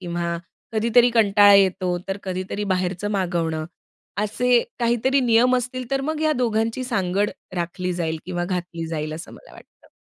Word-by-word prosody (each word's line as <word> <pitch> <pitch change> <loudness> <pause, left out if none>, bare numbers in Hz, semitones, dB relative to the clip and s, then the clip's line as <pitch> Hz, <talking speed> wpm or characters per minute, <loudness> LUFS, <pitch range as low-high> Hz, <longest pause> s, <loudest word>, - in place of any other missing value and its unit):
किंवा 170 -1 -3 0.4
कधीतरी 235 +2 +4
कंटाळा 205 -3 +6
येतो, 185 -2 +3
तर 195 - -1
कधीतरी 185 +2 -4
बाहेरचं 185 +2 -2
मागवणं. 170 -5 -1 0.6
असे 240 +3 +2 0.2
काहीतरी 240 +3 +2
नियम 245 +1 +4
असतील, 255 0 -4
तर 270 0 +1
मग 315 -1 -2
या 310 0 +2
दोघांची 225 +2 0
सांगड 200 -4 0 0.2
राखली 180 +1 -3
जाईल 165 -2 -2
किंवा 175 -1 -2
घातली 175 -2 -4
जाईल, 155 -1 -4
असं 165 +3 -9
मला - - -15
वाटतं. - - -18
195 Hz, 150 wpm, -23 LUFS, 175-235 Hz, 0.6 s, कंटाळा